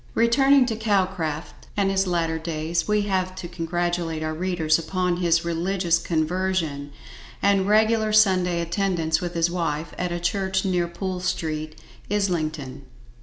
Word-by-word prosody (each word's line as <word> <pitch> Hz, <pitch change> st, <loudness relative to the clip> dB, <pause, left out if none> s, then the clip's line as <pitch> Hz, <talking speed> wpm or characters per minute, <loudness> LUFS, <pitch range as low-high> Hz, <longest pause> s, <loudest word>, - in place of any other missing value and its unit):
Returning 265 Hz, +4 st, +5 dB
to 230 Hz, -2 st, -2 dB
Calcraft 190 Hz, -7 st, -2 dB
and 195 Hz, -1 st, +2 dB
his 195 Hz, 0 st, +1 dB
latter 165 Hz, -2 st, 0 dB
days, 165 Hz, +1 st, -2 dB
we 210 Hz, -1 st, +2 dB
have 185 Hz, -2 st, -1 dB
to 185 Hz, -2 st, -6 dB
congratulate 175 Hz, -1 st, -2 dB
our 155 Hz, 0 st, -2 dB
readers 165 Hz, -2 st, +1 dB
upon 180 Hz, +1 st, -1 dB
his 170 Hz, -1 st, +2 dB
religious 170 Hz, +1 st, +1 dB
conversion, 160 Hz, -3 st, -1 dB, 0.5 s
and 200 Hz, -1 st, +2 dB
regular 220 Hz, +1 st, +3 dB
Sunday 185 Hz, -5 st, +3 dB
attendance 170 Hz, -2 st, 0 dB
with 175 Hz, -1 st, -4 dB
his 170 Hz, 0 st, +2 dB
wife, 165 Hz, -3 st, -2 dB
at 180 Hz, -1 st, -1 dB
a 175 Hz, -, -2 dB
church 190 Hz, +1 st, 0 dB
near 180 Hz, -2 st, +1 dB
Poole 185 Hz, +1 st, -4 dB
street, 155 Hz, -4 st, -3 dB, 0.3 s
Islington. 155 Hz, -9 st, -2 dB
175 Hz, 140 wpm, -24 LUFS, 165-195 Hz, 0.5 s, Returning